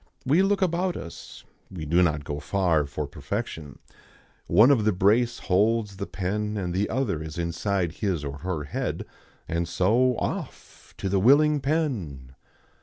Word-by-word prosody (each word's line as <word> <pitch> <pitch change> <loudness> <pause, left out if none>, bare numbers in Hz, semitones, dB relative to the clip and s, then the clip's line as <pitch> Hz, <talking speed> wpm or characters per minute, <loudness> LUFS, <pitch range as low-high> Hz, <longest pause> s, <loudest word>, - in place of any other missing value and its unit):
We 150 +8 +4
look 195 0 +2
about 180 +1 0
us. 85 - -10 0.3
We 85 -5 -7
do 85 +4 +3
not 75 -4 +1
go 75 0 -4
far 85 -2 +1
for 75 +1 -4
perfection. 75 +1 -5 0.7
One 110 +10 +6
of 120 -6 +3
the 110 - +3
brace 110 +6 +2
holds 105 +1 +1
the 100 - -4
pen 105 +4 -2
and 90 -3 -2
the 100 +3 0
other 110 - -1
is 80 0 -7
inside 85 +1 -1
his 85 -4 -2
or 70 0 -5
her 85 -2 -3
head; 70 - -3 0.4
and 85 +1 -1
so 110 +9 +2
Off! - - -6
to - - -3
the 95 0 +1
willing 145 +7 +5
pen. 115 - -2
95 Hz, 160 wpm, -26 LUFS, 80-120 Hz, 0.7 s, One